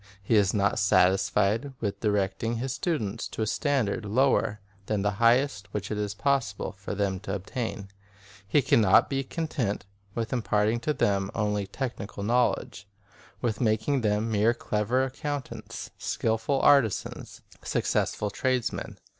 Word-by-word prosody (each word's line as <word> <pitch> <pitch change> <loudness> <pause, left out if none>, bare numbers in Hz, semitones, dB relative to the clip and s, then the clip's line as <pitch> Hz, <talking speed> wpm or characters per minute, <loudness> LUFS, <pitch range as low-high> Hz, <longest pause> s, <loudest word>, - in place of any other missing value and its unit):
He 100 - 0
is 100 -2 +4
not 100 -1 +1
satisfied 100 +6 +2
with 100 -3 -3
directing 105 +2 0
his 125 +3 -2
students 115 - -2
to 110 - -3
a - - +1
standard 120 -4 0
lower 105 -1 +2 0.3
than 105 -2 0
the 105 - +2
highest 115 -4 +3
which 105 0 -3
it 105 - -1
is 100 -1 -2
pos 135 -3 +1
sible 100 - -6
for 95 +1 -6
them 100 -2 -1
to 95 0 -4
attain. 105 +1 -4 0.6
He 145 +6 +3
can 120 - +4
not 105 +5 +5
be 135 0 0
content 130 - -2 0.3
with 115 +1 -2
imparting 110 -1 +1
to 150 +5 -1
them 100 -1 +1
only 105 -2 0
technical 105 -3 -5
knowledge, 115 -2 0 0.6
with 115 -1 -1
making 115 +4 +1
them 105 +1 0
merely 110 +3 +3
clever 120 +3 0
accountants, 140 +1 -5
skilful 115 +5 0
arti 140 -6 +6
sans, - - -7 0.2
successful 105 -1 -1
tradesmen. 130 +1 -1
110 Hz, 145 wpm, -27 LUFS, 100-125 Hz, 0.6 s, arti